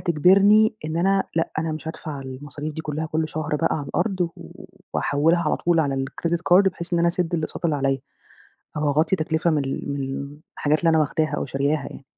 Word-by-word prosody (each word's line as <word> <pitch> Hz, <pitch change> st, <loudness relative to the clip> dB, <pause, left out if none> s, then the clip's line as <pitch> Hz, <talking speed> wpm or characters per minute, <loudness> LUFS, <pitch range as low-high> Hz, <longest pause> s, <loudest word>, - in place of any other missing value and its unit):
تجبرني، 200 Hz, +7 st, +5 dB
إن 155 Hz, +1 st, -3 dB
أنا 195 Hz, +2 st, +2 dB
لأ، 165 Hz, -, +1 dB
أنا 160 Hz, 0 st, -1 dB
مش 155 Hz, 0 st, -6 dB
هادفع 155 Hz, -3 st, -6 dB
المصاريف 145 Hz, +3 st, -7 dB
دي 160 Hz, -, -4 dB
كلّها 155 Hz, +1 st, -3 dB
كل 155 Hz, 0 st, -1 dB
شهر 155 Hz, -1 st, -2 dB
بقى 165 Hz, -, +1 dB
على 145 Hz, -3 st, -5 dB
الأرض 195 Hz, -4 st, -1 dB, 0.2 s
و 80 Hz, -, -12 dB, 0.3 s
وهاحولها 165 Hz, +4 st, +2 dB
على 155 Hz, -, +1 dB
طول 170 Hz, -1 st, +2 dB
على 140 Hz, -3 st, 0 dB
الcredit 170 Hz, +5 st, -2 dB, 0.2 s
card 190 Hz, -, +8 dB
بحيث 170 Hz, -1 st, -8 dB
إن 170 Hz, -, +3 dB
أنا 170 Hz, 0 st, +3 dB
أسدّ 175 Hz, 0 st, -1 dB
الأقساط 160 Hz, +1 st, -4 dB
اللي 155 Hz, -3 st, +2 dB
عليِّ 135 Hz, -1 st, 0 dB, 0.8 s
أهو 150 Hz, -1 st, +1 dB
أغطي 155 Hz, +6 st, +2 dB
تكلفة 160 Hz, +1 st, 0 dB
مل 140 Hz, -3 st, -1 dB
من 140 Hz, 0 st, -4 dB, 0.2 s
الحاجات 150 Hz, +1 st, +1 dB
اللي 165 Hz, -, +3 dB
أنا 160 Hz, -, +4 dB
واخداها 155 Hz, +1 st, 0 dB
أو -, -, -2 dB
شارياها 140 Hz, +2 st, -1 dB
ي -, -, -12 dB
155 Hz, 200 wpm, -23 LUFS, 145-170 Hz, 0.8 s, card